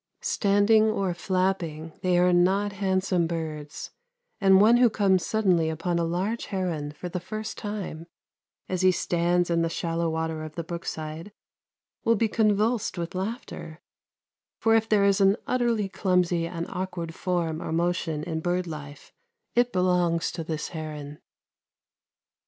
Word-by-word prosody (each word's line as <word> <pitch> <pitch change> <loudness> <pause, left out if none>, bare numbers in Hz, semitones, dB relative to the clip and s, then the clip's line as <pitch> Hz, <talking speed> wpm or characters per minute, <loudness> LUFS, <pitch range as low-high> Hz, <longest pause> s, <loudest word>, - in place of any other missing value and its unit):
Standing 215 - +3
or 200 -4 0
flapping 175 -3 -1
they 180 -1 +2
are 180 0 +4
not 190 +4 +3
handsome 190 -3 +1
birds 155 -3 -5 0.5
and 195 -2 +6
one 225 +4 +6
who 245 -1 +5
comes 195 -4 +2
suddenly 185 -7 +2
upon 170 +2 -1
a - - +1
large 185 +7 -1
heron 170 -7 -2
for 150 +4 -7
the 180 +1 -3
first 215 +4 -5
time 195 -6 -5 0.6
as 185 -1 -2
he 185 0 +6
stands 175 0 +1
in 170 0 +2
the 165 - +1
shallow 165 0 -1
water 160 0 -2
of 155 -1 -8
the 170 - -3
brookside, 165 +1 -6 0.7
will 230 - +4
be 225 +1 +2
convulsed 215 0 +1
with 170 -1 -4
laughter, 210 +7 -5 0.8
for 225 - +2
if 225 0 +3
there 205 -2 +4
is 200 0 +3
an 195 +2 +5
utterly 235 -5 +1
clumsy 180 -3 +1
and 170 -1 -4
awkward 180 -3 -4
form 170 -3 -1
or - - -4
motion 165 -2 0
in 160 -1 -3
bird 175 +2 -1
life 145 -3 -9 0.4
it 245 0 +3
belongs 180 -3 +1
to 165 -1 -5
this 155 -1 -4
heron. 150 -2 -7
180 Hz, 150 wpm, -26 LUFS, 165-200 Hz, 0.8 s, and